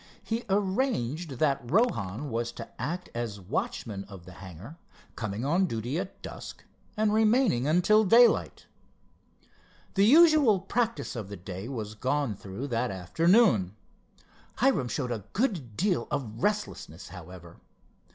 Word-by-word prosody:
He 230 Hz, +1 st, -3 dB
arranged 190 Hz, -, 0 dB
that 140 Hz, 0 st, +1 dB
Rohan 140 Hz, -, 0 dB
was 120 Hz, +1 st, -2 dB
to -, -, -8 dB
act 175 Hz, +3 st, -4 dB
as 115 Hz, -4 st, -4 dB
watchman 100 Hz, +2 st, -3 dB
of 95 Hz, -4 st, -12 dB
the 90 Hz, -, -11 dB
hangar, 95 Hz, -, -11 dB, 0.4 s
coming 110 Hz, +2 st, -4 dB
on 175 Hz, +6 st, +2 dB
duty 120 Hz, +4 st, -3 dB
at 190 Hz, +1 st, -7 dB
dusk, -, -, -8 dB, 0.3 s
and 215 Hz, -1 st, +2 dB
remaining 220 Hz, -, +3 dB
until 180 Hz, +7 st, +4 dB
daylight. 230 Hz, +4 st, +4 dB, 1.3 s
The 195 Hz, 0 st, +4 dB
usual 300 Hz, -, +6 dB
practice 195 Hz, -, -2 dB
of 110 Hz, -4 st, -5 dB
the 100 Hz, -, -7 dB
day 95 Hz, +5 st, -7 dB
was 110 Hz, -5 st, -5 dB
gone 130 Hz, +1 st, -1 dB
through 100 Hz, +7 st, -7 dB
that 120 Hz, +1 st, 0 dB
afternoon. 105 Hz, -, +3 dB, 0.8 s
Hiram 240 Hz, -, +2 dB
showed 125 Hz, 0 st, -3 dB
a 110 Hz, -5 st, -4 dB
good 175 Hz, -, -1 dB
deal 180 Hz, -, +1 dB
of 120 Hz, -6 st, -4 dB
restlessness, 205 Hz, -, -2 dB
however. 90 Hz, -1 st, -11 dB
135 Hz, 130 wpm, -28 LUFS, -, 1.3 s, usual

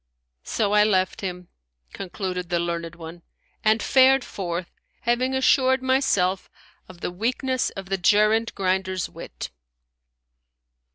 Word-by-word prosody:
So 205 Hz, -2 st, 0 dB
I 210 Hz, 0 st, +6 dB
left 190 Hz, -3 st, +1 dB
him, 180 Hz, -2 st, -5 dB, 0.5 s
(concluded 180 Hz, -2 st, -5 dB
the 175 Hz, -, +1 dB
learned 170 Hz, -1 st, -3 dB
one) 165 Hz, +1 st, -10 dB, 0.4 s
and 220 Hz, 0 st, +3 dB
fared 265 Hz, 0 st, +5 dB
forth, 175 Hz, -2 st, -4 dB, 0.3 s
having 250 Hz, +3 st, +1 dB
assured 260 Hz, 0 st, +3 dB
myself 200 Hz, -8 st, +1 dB, 0.4 s
of 180 Hz, -2 st, -13 dB
the -, -, -3 dB
weakness 250 Hz, +6 st, -1 dB
of 195 Hz, -1 st, -9 dB
the 195 Hz, 0 st, -1 dB
gerund 215 Hz, +5 st, +3 dB
grinder's 185 Hz, -1 st, -1 dB
wit." -, -, -8 dB
195 Hz, 120 wpm, -24 LUFS, 180-240 Hz, 0.5 s, I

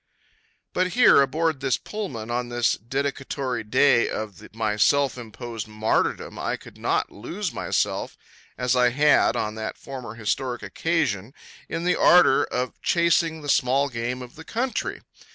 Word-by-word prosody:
But 185 Hz, 0 st, 0 dB
here 245 Hz, -, +7 dB
aboard 160 Hz, +1 st, 0 dB
this 135 Hz, -2 st, +1 dB
Pullman 130 Hz, -, -6 dB
on 120 Hz, 0 st, -2 dB
this, 120 Hz, -1 st, +1 dB
the -, -, -2 dB
dedicatory 135 Hz, +1 st, -3 dB
day 125 Hz, +2 st, +3 dB
of 105 Hz, -1 st, -7 dB
my 110 Hz, -2 st, 0 dB
self 140 Hz, +5 st, +3 dB
imposed 115 Hz, -2 st, -7 dB
martyrdom, 110 Hz, +1 st, -1 dB
I -, -, -2 dB
could -, -, -15 dB
not -, -, 0 dB
lose -, -, -5 dB
myself -, -, -1 dB, 0.4 s
as 125 Hz, 0 st, +1 dB
I 125 Hz, -1 st, +4 dB
had 145 Hz, +4 st, +4 dB
on 105 Hz, -, -1 dB
that 110 Hz, -, -4 dB
former 125 Hz, -5 st, -8 dB
historic 120 Hz, +2 st, -2 dB
occasion 115 Hz, -, -1 dB, 0.3 s
in 165 Hz, -, -3 dB
the 180 Hz, -, +2 dB
ardor 175 Hz, -6 st, +6 dB
of 125 Hz, 0 st, -4 dB
chasing 165 Hz, -2 st, +2 dB
the -, -, -7 dB
small 135 Hz, +1 st, +2 dB
game 120 Hz, +1 st, -3 dB
of 120 Hz, -, -12 dB
the 160 Hz, -, -9 dB
country. 240 Hz, +8 st, -3 dB
125 Hz, 155 wpm, -24 LUFS, 115-145 Hz, 0.4 s, here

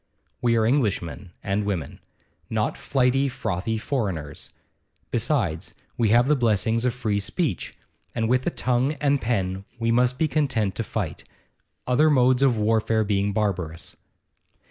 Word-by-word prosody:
We 120 Hz, -1 st, +3 dB
are 110 Hz, -, +3 dB
Englishmen 105 Hz, -, 0 dB
and 100 Hz, +1 st, 0 dB
women 95 Hz, -9 st, -3 dB, 0.5 s
not -, -, 0 dB
flighty, 135 Hz, +1 st, +1 dB
frothy 110 Hz, -2 st, -2 dB
foreigners. 100 Hz, -, -3 dB, 0.6 s
Besides, -, -, -1 dB, 0.2 s
we 115 Hz, -3 st, +2 dB
have 120 Hz, +4 st, +5 dB
the 150 Hz, -, +4 dB
blessings 115 Hz, -1 st, +1 dB
of 125 Hz, -1 st, +1 dB
free 110 Hz, -5 st, -1 dB
speech, 100 Hz, -, -2 dB, 0.4 s
and 115 Hz, -1 st, 0 dB
with 125 Hz, +2 st, +3 dB
the -, -, +2 dB
tongue 125 Hz, +3 st, 0 dB
and 140 Hz, -1 st, +1 dB
pen 95 Hz, -5 st, -1 dB
we 115 Hz, -1 st, 0 dB
must 125 Hz, +1 st, +2 dB
be 160 Hz, -, +2 dB
content 130 Hz, -10 st, 0 dB
to 115 Hz, -, -3 dB
fight, 100 Hz, -8 st, -4 dB, 0.6 s
other 145 Hz, +5 st, +4 dB
modes 130 Hz, -2 st, +4 dB
of 130 Hz, -4 st, +4 dB
warfare 110 Hz, +1 st, +2 dB
being 100 Hz, -1 st, 0 dB
barbarous. 90 Hz, -6 st, -2 dB
115 Hz, 145 wpm, -24 LUFS, 100-125 Hz, 0.6 s, have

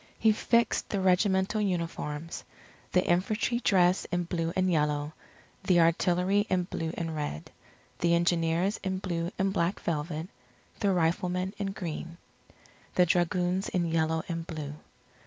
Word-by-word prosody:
He 220 Hz, -, +4 dB
fixed 235 Hz, +2 st, +1 dB
the 200 Hz, -, -1 dB
regimental 190 Hz, +2 st, +2 dB
uniforms; 165 Hz, -4 st, -3 dB, 0.5 s
the 180 Hz, -, +3 dB
infantry 215 Hz, +7 st, +1 dB
dress 185 Hz, -5 st, +3 dB
in 175 Hz, 0 st, -1 dB
blue 165 Hz, -1 st, -2 dB
and 185 Hz, -1 st, +2 dB
yellow, 150 Hz, -1 st, 0 dB, 0.5 s
the 180 Hz, -2 st, +4 dB
artillery 180 Hz, +4 st, +3 dB
in 185 Hz, -1 st, +2 dB
blue 165 Hz, -2 st, -4 dB
and 165 Hz, -2 st, -3 dB
red; 145 Hz, -, -4 dB, 0.5 s
the 170 Hz, 0 st, +3 dB
engineers 170 Hz, +3 st, +1 dB
in 190 Hz, -1 st, -1 dB
blue 175 Hz, -2 st, -3 dB
and 195 Hz, 0 st, +1 dB
black 175 Hz, 0 st, 0 dB
velvet; 160 Hz, 0 st, -3 dB, 0.5 s
the 200 Hz, -, +2 dB
riflemen 180 Hz, +2 st, 0 dB
in 200 Hz, -, -1 dB
green; 170 Hz, -3 st, -6 dB, 0.8 s
the 180 Hz, -, +5 dB
dragoons 180 Hz, +2 st, +1 dB
in 180 Hz, -2 st, 0 dB
yellow 160 Hz, 0 st, +1 dB
and 165 Hz, -1 st, -4 dB
blue. 150 Hz, -3 st, -5 dB
175 Hz, 140 wpm, -29 LUFS, 165-190 Hz, 0.8 s, the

